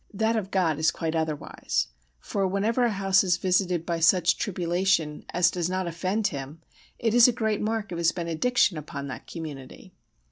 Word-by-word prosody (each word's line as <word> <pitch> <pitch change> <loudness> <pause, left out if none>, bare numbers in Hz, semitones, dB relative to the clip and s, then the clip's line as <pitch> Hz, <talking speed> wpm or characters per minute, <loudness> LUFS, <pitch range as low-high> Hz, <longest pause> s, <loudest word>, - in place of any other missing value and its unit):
That 220 +3 +1
of 205 -4 -2
God 170 -6 +1
is 155 - +3
quite 160 -1 -3
otherwise: 160 -2 -2 0.3
for 195 - -1
whenever 215 +6 +1
a - - +2
house 195 -1 +3
is 180 -2 +2
visited 180 -2 +1
by 170 -1 -2
such 170 0 +4
tribulation 175 -4 0
as 175 0 +3
does 175 -1 -2
not 185 0 -1
offend 185 +5 -2
Him 140 +1 -7 0.4
it 225 -2 0
is 240 0 +8
a - - +4
great 220 -3 -1
mark 220 -2 -2
of 170 - -4
His 170 0 +3
benediction 170 +2 +1
upon 140 -2 -7
that 130 - -8
community. 150 -6 -9
180 Hz, 180 wpm, -26 LUFS, 165-200 Hz, 0.4 s, is